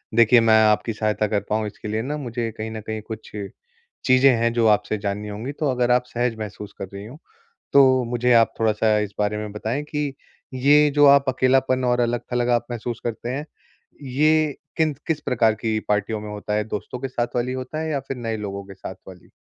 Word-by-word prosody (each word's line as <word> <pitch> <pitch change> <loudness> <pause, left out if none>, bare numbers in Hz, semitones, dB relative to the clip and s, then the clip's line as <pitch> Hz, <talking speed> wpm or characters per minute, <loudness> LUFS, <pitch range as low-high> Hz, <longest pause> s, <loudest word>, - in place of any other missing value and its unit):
देखिए 115 +1 +6
मैं 110 -1 +5
आपकी 105 +1 +2
सहायता 105 0 0
कर 105 0 0
पाऊँ 110 0 0
इसके 105 - -9
लिए 110 +1 -1
ना 145 +5 -3
मुझे 120 -4 -4
कहीं 110 0 -5
न 110 -1 -6
कहीं 110 -1 -3
कुछ 110 0 -9 0.7
चीज़ें 130 +1 +6
हैं, 115 0 +1
जो 115 -2 +3
आपसे 105 0 +2
जाननी 100 +1 -3
होंगी 110 +7 -5
तो 150 -1 -2
अगर 125 -1 +1
आप 125 0 +4
सहज 120 -1 -2
महसूस 105 -1 -7
कर 95 - -6
रही 100 +1 -7
हों 130 +7 -11 0.6
तो 130 -2 +5
मुझे 125 0 +2
आप 115 -1 +5
थोड़ा-सा 110 0 +2
इस 105 -1 -3
बारे 105 0 0
में 105 -1 -5
बताएँ 115 +7 -3
कि 150 -2 -3 0.4
ये 145 +3 +5
जो 145 -1 +6
आप 140 0 +7
अकेलापन 130 0 +2
और 125 0 +2
अलग-थलग 120 +1 -1
आप 120 0 +1
महसूस 120 0 -4
करते 120 0 -4
हैं, 140 +3 -3 0.6
ये 150 +2 +2 0.2
किन 155 -3 +1
किस 160 -3 -1
प्रकार 115 -3 +2
की 110 0 -1
पार्टियों 105 +1 0
में 105 - -7
होता 105 0 -4
है? 105 0 0
दोस्तों 110 +3 -5
के 135 - -3
साथ 120 -1 -3
वाली 125 +1 0
होता 130 +4 -5
है 160 0 -3
या 140 -2 -1
फिर 135 - -3
नए 115 -2 -3
लोगों 100 -2 -5
के 95 0 -11
साथ - - -8
वाली? - - -14
120 Hz, 215 wpm, -23 LUFS, 110-130 Hz, 0.7 s, आप